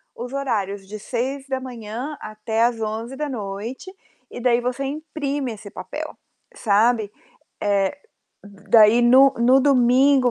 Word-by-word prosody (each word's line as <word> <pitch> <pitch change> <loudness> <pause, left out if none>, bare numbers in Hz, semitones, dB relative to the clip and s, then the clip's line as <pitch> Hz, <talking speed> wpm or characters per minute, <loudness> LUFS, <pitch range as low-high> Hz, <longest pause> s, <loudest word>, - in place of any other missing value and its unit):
os 245 +2 -7
horários 205 -8 -2
de 215 +1 -7
6:00 265 +5 -4
da 265 -1 -2
manhã 250 +3 -6
até 215 +1 -2
às 235 -1 +1
23:00 225 +4 -4
da 300 +1 -3
noite, 225 - -6 0.4
e - - -7
daí 240 -1 +3
você 250 +2 -2
imprime 285 -3 -3
esse 210 -1 -11
papel, - - -7 0.4
sabe. 220 0 +2 0.5
Eh, 200 +3 +1 0.5
daí, 210 +3 +4
no 260 +3 +6
no 250 +3 +5
domingo, 260 0 +4
240 Hz, 135 wpm, -22 LUFS, 215-270 Hz, 0.5 s, no